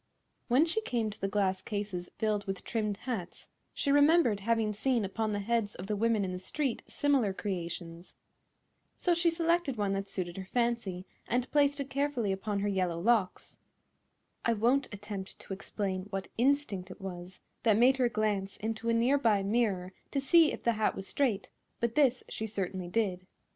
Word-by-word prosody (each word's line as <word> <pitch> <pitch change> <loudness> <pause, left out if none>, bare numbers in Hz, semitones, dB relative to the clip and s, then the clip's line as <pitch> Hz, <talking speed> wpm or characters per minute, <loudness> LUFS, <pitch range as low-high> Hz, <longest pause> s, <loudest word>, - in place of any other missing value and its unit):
When 260 +6 +5
she 345 +7 +1
came 235 - -1
to 205 - -11
the 195 - +1
glass 195 -2 0
cases 200 -4 -4
filled 210 -2 0
with 195 -1 -4
trimmed 210 -3 -1
hats 210 -9 -5 0.2
she 280 - -1
remembered 290 -6 +5
having 220 0 +1
seen 230 +1 +1
upon 215 +3 -2
the 205 - -1
heads 225 -1 0
of 180 - -7
the 210 +1 -1
women 220 -1 +2
in 185 - -3
the 180 - -4
street 265 +6 -2
similar 270 -9 +2
creations. 175 -3 -5 0.8
So 355 - +2
she 340 0 +3
selected 335 -5 +1
one 200 -2 0
that 195 0 -3
suited 175 -2 -4
her 190 - -5
fancy 235 -7 0 0.2
and 245 +1 0
placed 285 -1 +3
it 275 -1 -4
carefully 275 -7 0
upon 200 +1 -2
her 205 - 0
yellow 185 -4 0
locks. 210 -1 +1 0.9
I 230 - +3
won't 245 +6 +2
attempt 205 -2 -6
to - - -7
explain 190 -1 -3
what 195 -1 -4
instinct 240 -7 +1
it 185 - -10
was 185 -1 -7 0.2
that 220 -3 +4
made 255 +3 +5
her 250 -2 +3
glance 210 -3 -1
into 225 +1 -3
a - - +3
near 250 +5 +3
by 215 -6 +3
mirror 195 -4 0 0.2
to 280 - -1
see 320 +3 +5
if - - -6
the 235 - +3
hat 215 -1 +1
was 195 - -5
straight, 235 -9 0 0.3
but 235 -1 0
this 260 -3 +3
she 220 - -4
certainly 190 -3 -3
did. 185 -2 -1
215 Hz, 185 wpm, -31 LUFS, 195-250 Hz, 0.9 s, When